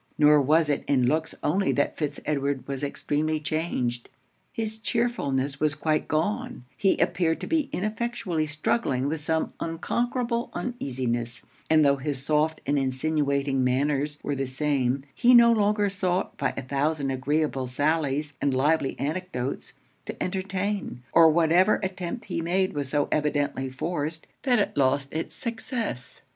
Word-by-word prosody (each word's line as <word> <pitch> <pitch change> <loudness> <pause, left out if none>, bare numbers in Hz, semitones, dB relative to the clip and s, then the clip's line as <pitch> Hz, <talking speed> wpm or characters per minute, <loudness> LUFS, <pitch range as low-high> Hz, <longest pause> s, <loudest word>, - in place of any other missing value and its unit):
Nor 150 0 +6
was 155 +3 +3
it 145 -1 0
in 130 -3 +3
looks 155 +5 0
only 190 +6 +2
that 145 - 0
Fitz 145 -2 -3
Edward 140 -2 -1
was 140 0 -4
extremely 150 +2 -1
changed. 145 -6 -2 0.4
His 220 -1 -3
chearfulness 140 - -1
was 150 -1 +1
quite 155 0 0
gone; 205 - -2
he 195 - +2
appeared 165 -2 +1
to - - -3
be 310 -4 0
ineffectually 210 -6 -2
struggling 150 - 0
with 155 +1 -2
some 160 +1 -1
unconquerable 235 +8 -1
uneasiness; 125 - -3 0.2
and 155 -1 +5
tho' 140 0 +4
his 135 -1 -3
soft 155 +1 +1
and 145 +1 +2
insinuating 140 0 0
manners 140 +3 +1
were 145 - -1
the 135 0 -2
same, 135 -1 0
he 250 0 +5
no 235 -1 +8
longer 210 -1 +2
sought, 185 -1 -1
by 135 -2 0
a - - -3
thousand 140 +1 0
agreeable 135 0 0
sallies 150 +2 0
and 140 -2 +1
lively 145 +1 +1
anecdotes, 145 -4 -3 0.3
to - - -4
entertain; 190 -6 -3
or 165 -1 +8
whatever 170 +5 +4
attempt 190 +4 -4
he - - -3
made 185 +3 0
was 145 -2 -3
so 145 0 +1
evidently 145 -3 0
forced, 160 +3 -3 0.2
that 255 -3 +3
it 205 - 0
lost 140 0 +2
it's 160 +1 -4
success. 230 - -4
150 Hz, 150 wpm, -26 LUFS, 140-185 Hz, 0.4 s, no